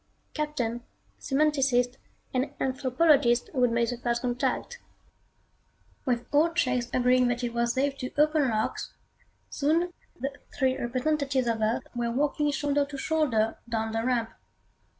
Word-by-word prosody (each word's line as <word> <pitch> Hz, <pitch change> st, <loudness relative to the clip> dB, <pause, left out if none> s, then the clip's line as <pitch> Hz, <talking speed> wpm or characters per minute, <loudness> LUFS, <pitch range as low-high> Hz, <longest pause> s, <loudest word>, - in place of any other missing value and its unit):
Captain, 255 Hz, -6 st, -2 dB, 0.4 s
semanticist 270 Hz, -4 st, +2 dB, 0.4 s
and 270 Hz, +3 st, -1 dB
anthropologist 260 Hz, -1 st, +2 dB
would 250 Hz, -2 st, +3 dB
make 235 Hz, 0 st, +2 dB
the 245 Hz, -, -4 dB
First 235 Hz, 0 st, -1 dB
Contact. 250 Hz, -, -1 dB, 1.3 s
With 245 Hz, -3 st, 0 dB
all 310 Hz, +3 st, +4 dB
checks 255 Hz, -6 st, 0 dB
agreeing 250 Hz, 0 st, +3 dB
that 245 Hz, +1 st, -1 dB
it 235 Hz, -1 st, -2 dB
was 235 Hz, 0 st, +1 dB
safe 275 Hz, +1 st, 0 dB
to 255 Hz, -, -3 dB
open 300 Hz, -2 st, +3 dB
locks, 215 Hz, -1 st, -2 dB, 0.6 s
soon 330 Hz, +5 st, +1 dB, 0.3 s
the 270 Hz, +3 st, -2 dB, 0.3 s
three 260 Hz, -1 st, +2 dB
representatives 265 Hz, +2 st, 0 dB
of 230 Hz, -2 st, -1 dB
Earth 220 Hz, +2 st, +1 dB
were 240 Hz, -1 st, -1 dB
walking 295 Hz, +4 st, +1 dB
shoulder 290 Hz, 0 st, +1 dB
to 280 Hz, 0 st, -7 dB
shoulder 265 Hz, -8 st, +1 dB
down 225 Hz, -1 st, -1 dB
the 225 Hz, 0 st, -1 dB
ramp. 235 Hz, -2 st, 0 dB
255 Hz, 135 wpm, -27 LUFS, 240-290 Hz, 1.3 s, all